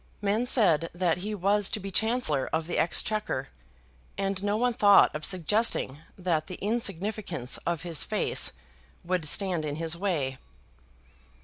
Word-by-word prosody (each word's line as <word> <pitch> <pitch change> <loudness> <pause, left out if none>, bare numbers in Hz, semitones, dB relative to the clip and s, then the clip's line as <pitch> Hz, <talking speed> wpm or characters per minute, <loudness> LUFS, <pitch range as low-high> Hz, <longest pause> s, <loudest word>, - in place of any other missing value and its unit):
Men 210 +4 0
said 165 - +3
that 175 -1 0
he 210 +3 -4
was 200 +1 +2
to 220 - -2
be 195 0 -7
Chancellor 220 - +1
of 160 0 -1
the 175 - -2
Exchequer, 175 -6 0 0.7
and 195 -1 -1
no 205 +1 0
one 245 +1 +1
thought 205 -6 +5
of 155 - -5
suggesting 185 - +1 0.2
that 170 -4 -1
the 185 - -6
insignificance 200 - -2
of 170 -1 -1
his 170 -3 0
face - - +1 0.5
would 180 -2 -1
stand 180 0 +1
in 145 -1 -3
his 165 +1 -3
way. 155 -9 -2
185 Hz, 145 wpm, -27 LUFS, 160-205 Hz, 0.7 s, thought